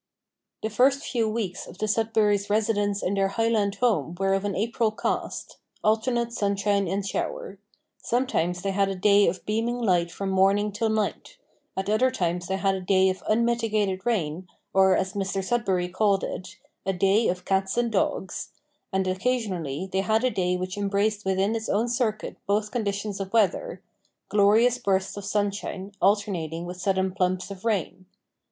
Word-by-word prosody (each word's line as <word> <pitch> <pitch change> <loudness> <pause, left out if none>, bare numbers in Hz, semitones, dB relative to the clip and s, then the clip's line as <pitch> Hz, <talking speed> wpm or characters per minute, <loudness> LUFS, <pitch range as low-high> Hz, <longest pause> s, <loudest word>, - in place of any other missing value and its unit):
The 220 - -2
first 270 +5 +3
few 230 -4 0
weeks 210 -5 -3
of - - -12
the 215 - -1
Sudberrys' 210 -2 +1
residence 205 -1 +1
in 185 - 0
their 195 -1 +2
Highland 210 -1 +1
home 195 - +1
were 195 0 +2
of 195 +1 0
an 200 -2 -1
April 225 +2 +1
cast 215 - -3 0.3
alternate 235 +2 +1
sunshine 200 -2 +1
and 195 +3 -2
shower. 195 0 -4 0.4
Sometimes 180 -8 0
they 195 - 0
had 195 0 +1
a 195 - -2
day 200 +2 +4
of 175 +2 -2
beaming 225 +3 0
light 180 -7 +2
from 195 +2 -3
morning 195 +2 +3
till 220 +2 -1
night; 220 - -2 0.4
at 190 - -2
other 215 +5 +3
times 175 -7 -2
they 190 - -1
had 195 0 +1
a 190 - -3
day 190 +1 +3
of 185 - -7
unmitigated 215 -4 +1
rain, 185 -6 -1 0.3
or, 190 -1 +5
as 190 +1 -1
Mr 195 -1 -2
Sudberry 190 -5 0
called 200 0 +2
it, 185 - -6 0.3
"a 195 - 0
day 195 +5 +3
of 180 0 -2
cats 190 +2 0
and 240 -1 +1
dogs;" 190 -2 -1 0.4
and 190 0 0
occasionally 185 - -1
they 190 - +1
had 220 +3 +1
a 255 - +2
day 180 -2 0
which 185 +2 -4
embraced 205 +1 0
within 190 +3 +1
its 225 0 -3
own 220 +4 +1
circuit 235 -3 -1
both 210 +1 +1
conditions 205 -3 -2
of 195 -1 -4
weather 230 - +1 0.5
glorious 220 +4 +4
bursts 195 -4 0
of 200 -1 -7
sunshine 200 -1 -2
alternating 180 -5 +1
with 180 +1 -7
sudden 190 -1 +1
plumps 185 0 -1
of 195 -1 -9
rain. 190 -4 -1
200 Hz, 170 wpm, -26 LUFS, 190-220 Hz, 0.5 s, or